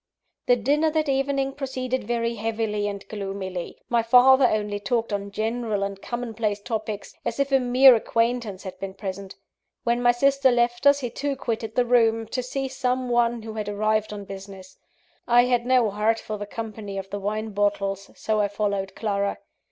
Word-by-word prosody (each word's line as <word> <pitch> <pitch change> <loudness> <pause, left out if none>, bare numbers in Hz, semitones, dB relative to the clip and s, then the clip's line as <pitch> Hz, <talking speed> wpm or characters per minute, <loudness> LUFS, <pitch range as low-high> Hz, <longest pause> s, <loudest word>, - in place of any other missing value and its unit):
The 245 - +6
dinner 290 +7 +2
that 310 0 0
evening 275 0 0
proceeded 260 -3 -3
very 235 0 -1
heavily 215 -2 -2
and 200 -1 -6
gloomily. 195 -3 -5
My 235 -1 +2
father 255 +3 +6
only 210 -2 -1
talked 225 +2 -1
on 200 0 -3
general 220 0 -2
and 200 0 -4
commonplace 225 -4 -3
topics, 210 -2 -4
as - - -3
if 280 0 +1
a 270 - +5
mere 255 +1 +7
acquaintance 230 -3 0
had 185 -1 -8
been 190 0 -6
present. 195 0 -6 0.5
When 240 0 +1
my 245 0 +5
sister 275 +2 +3
left 240 +2 +2
us, 280 0 +5
he 245 -2 -3
too 280 +3 -2
quitted 225 -3 -4
the 250 - +3
room, 225 -2 +3
to 255 - -2
see 270 +2 -3
some 255 -1 -1
one 235 -1 +1
who 220 0 -7
had 210 -1 -4
arrived 215 +1 0
on 205 -1 -7
business. 195 -1 -10 0.5
I 240 0 +6
had 245 -1 +1
no 250 -4 +3
heart 215 +2 +1
for 215 -1 -6
the 205 - -5
company 215 -2 -6
of 195 0 -6
the 205 - -3
wine 215 +2 -3
bottles, 200 -1 -1
so 215 -1 -1
I 205 - +3
followed 200 -1 -2
Clara. 200 -2 -1
225 Hz, 185 wpm, -24 LUFS, 205-245 Hz, 0.5 s, mere